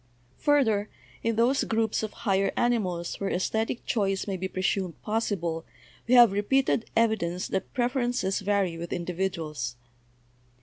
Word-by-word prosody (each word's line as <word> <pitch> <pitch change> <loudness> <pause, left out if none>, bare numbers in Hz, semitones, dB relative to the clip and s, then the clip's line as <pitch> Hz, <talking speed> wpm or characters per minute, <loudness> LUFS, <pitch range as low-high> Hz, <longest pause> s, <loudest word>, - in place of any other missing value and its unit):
Further, 225 -8 +2 0.3
in 230 0 0
those 240 +5 +3
groups 225 -1 0
of 215 -1 -3
higher 195 -1 +2
animals 185 -8 0
where 195 - -1
esthetic 220 +6 -1
choice 195 -4 0
may 195 - -2
be 190 +1 -3
presumed 185 -1 -1
possible 195 -7 -1 0.4
we 250 - +5
have 240 -4 +8
repeated 230 +4 +1
evidence 205 -6 +1
that 190 -1 -2
prefer 245 +1 +1
ences 200 -5 -1
vary 195 -4 0
with 170 0 -5
individuals. 165 -8 -3
200 Hz, 135 wpm, -27 LUFS, 180-230 Hz, 0.4 s, have